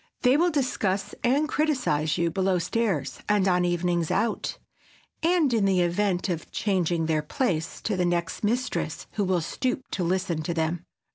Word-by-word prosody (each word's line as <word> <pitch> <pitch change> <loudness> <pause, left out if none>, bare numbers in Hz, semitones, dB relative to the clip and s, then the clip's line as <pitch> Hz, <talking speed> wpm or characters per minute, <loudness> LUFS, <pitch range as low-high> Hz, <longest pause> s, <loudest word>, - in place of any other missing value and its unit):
They 250 +1 +5
will 345 +4 +4
discuss 235 - -1
and 275 +5 +3
criticize 250 - +1
you 170 -1 +1
below 190 +1 +1
stairs 170 - -1
and 205 -2 +3
on 180 -1 +3
"evenings 175 -1 0
out," 225 +1 -1 0.6
and, 330 -5 +3
in 220 -4 +3
the 190 -2 +3
event 180 +2 +1
of 170 -4 -3
"changing 175 -5 0
their 155 -1 +1
place," 160 - -2
to 215 - -1
the 180 - +1
next 175 +1 -1
mistress 220 -8 -1
who 205 - -1
will 185 -2 +1
stoop 255 - -2
to 185 - -1
listen 175 -2 0
to 170 +2 -3
them. 165 +1 -1
185 Hz, 165 wpm, -26 LUFS, 170-230 Hz, 0.6 s, They